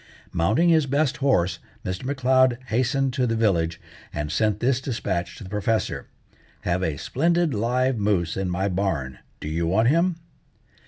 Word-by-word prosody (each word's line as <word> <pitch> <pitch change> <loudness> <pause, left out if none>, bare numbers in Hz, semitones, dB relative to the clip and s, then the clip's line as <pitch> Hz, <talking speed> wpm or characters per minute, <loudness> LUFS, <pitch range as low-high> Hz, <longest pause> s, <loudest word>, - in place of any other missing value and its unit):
Mounting 110 - +3
his 160 -4 +4
best 140 +1 +1
horse, 115 -11 +1 0.3
Mr. 95 +3 -3
M'Leod 130 -2 +3
hastened 130 +3 +1
to 125 -1 +1
the 115 - 0
village, 85 -7 +1 0.3
and 75 0 -3
sent 105 +2 +1
this 130 +2 +1
despatch 95 -9 -3
to - - -9
the 95 - -9
professor: 105 +2 -1 0.5
"Have 90 +1 0
a 80 -5 -1
splendid 170 - +1
live 125 +3 +1
moose 95 -5 +1
in 95 -1 -2
my 95 +2 0
barn. 85 -10 -2 0.2
Do - - -6
you 80 +2 -1
want 110 +7 +3
him?" 170 +4 +2
110 Hz, 160 wpm, -24 LUFS, 90-130 Hz, 0.5 s, his